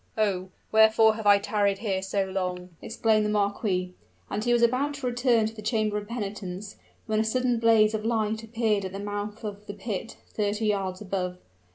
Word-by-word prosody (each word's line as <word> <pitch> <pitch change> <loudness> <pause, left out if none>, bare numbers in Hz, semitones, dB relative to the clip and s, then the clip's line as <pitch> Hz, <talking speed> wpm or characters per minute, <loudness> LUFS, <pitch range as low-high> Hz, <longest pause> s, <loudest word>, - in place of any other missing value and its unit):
"Oh! 190 -4 0 0.2
wherefore 220 0 +6
have 215 -1 -4
I 205 0 +8
tarried 200 -1 0
here 195 -3 -1
so 195 +1 -1
long?" 180 -1 -3
exclaimed 220 -1 +1
the 210 - 0
marquis; 200 -3 0 0.4
and 210 +1 -2
he 240 - +1
was 240 0 +3
about 265 +5 +2
to 275 -2 -6
return 245 -2 +2
to 220 - -3
the 220 - -9
chamber 215 -1 0
of 205 - -10
penitence, 205 -3 -5 0.3
when 215 -1 0
a - - +3
sudden 245 +1 +1
blaze 225 -2 +5
of 215 -1 -2
light 220 -1 0
appeared 225 -2 0
at 190 0 -5
the 195 - -5
mouth 205 +1 -5
of 210 -1 -7
the 205 - -6
pit, 210 +1 -5 0.2
thirty 210 +1 -1
yards 195 -3 -1
above. 185 -2 -3
210 Hz, 195 wpm, -27 LUFS, 200-225 Hz, 0.4 s, I